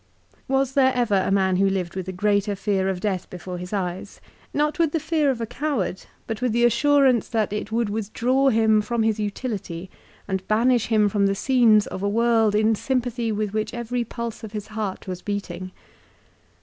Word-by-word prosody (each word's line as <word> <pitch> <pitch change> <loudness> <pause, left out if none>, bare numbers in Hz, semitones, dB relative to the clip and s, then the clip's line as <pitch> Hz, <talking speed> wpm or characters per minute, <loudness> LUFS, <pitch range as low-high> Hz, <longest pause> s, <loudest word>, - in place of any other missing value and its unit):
Was 270 0 +1
there 265 -2 +4
ever 240 -4 +1
a 190 -1 +2
man 190 -2 +2
who 195 +1 +3
lived 185 -3 -2
with 190 -1 -4
a - - -3
greater 205 +2 +1
fear 195 -1 0
of 190 -2 -2
death 190 -3 -2
before 180 0 -7
his 180 0 -7
eyes; 185 -3 -4 0.3
not 300 +4 0
with 325 -3 +2
the 325 - +1
fear 315 -2 +1
of 255 -3 -1
a 230 - -2
coward, 245 - -3 0.2
but 225 0 -5
with 250 -3 0
the 240 +1 +3
assurance 270 -1 +3
that 220 -3 -1
it 210 +1 -4
would 230 0 +1
withdraw 230 +6 +1
him 220 -2 +3
from 225 +2 -1
his 220 -1 +1
utility 205 -5 -4 0.4
and 190 -1 -3
banish 235 +2 +2
him 215 -2 +3
from 200 -1 +2
the 195 - 0
scenes 225 -2 +4
of 190 - -6
a 200 - 0
world 225 -1 +2
in 215 +1 +3
sym 260 +4 0
pathy 235 -2 -2
with 210 -1 -2
which 215 +2 -2
every 240 +1 -2
pulse 235 0 -6
of 220 -1 -8
his 210 0 -6
heart 210 -3 -4
was 185 -1 -5
beating? 185 -3 -4
215 Hz, 200 wpm, -23 LUFS, 195-240 Hz, 0.4 s, there